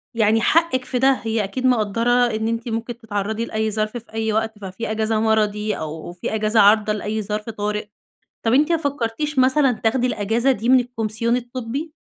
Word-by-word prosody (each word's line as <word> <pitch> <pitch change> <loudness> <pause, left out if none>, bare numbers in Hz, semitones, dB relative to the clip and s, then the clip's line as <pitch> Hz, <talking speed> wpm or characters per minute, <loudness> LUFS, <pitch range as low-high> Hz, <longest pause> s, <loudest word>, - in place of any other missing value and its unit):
يعني 220 0 +3
حقِك 320 -2 +2
في 250 - -2
ده 265 +2 +5
هي 225 -1 0
أكيد 250 +7 -4
مقدّرة 230 -1 +2
إن 240 -3 +2
أنتِ 230 +1 -3
ممكن 230 +1 -4
تتعرّضي 220 0 -3
لأي 220 -1 -2
ظرف 215 +2 -2
في 235 -1 -13
أي 220 -1 -1
وقت، 220 0 -1
ففي 200 +3 -5
أجازة 220 0 0
مرضي 215 -1 +1
أو 160 +2 -6
في 180 +4 -4
أجازة 215 +1 +2
عارضة 210 +1 +5
لأي 215 +1 -3
ظرف 210 +2 -4
طارئ. 210 -1 -3 0.6
طب 225 - +1
أنتِ 295 +6 +3
ما 335 - +3
فكّرتيش 285 0 -2
مثلًا 260 +1 +4
تاخدي 240 +2 0
الأجازة 230 +3 +1
دي 235 -1 -3
من 260 0 +6
الكومسيون 230 -1 -1
الطبّي؟ 250 +5 -5
225 Hz, 185 wpm, -21 LUFS, 215-245 Hz, 0.6 s, من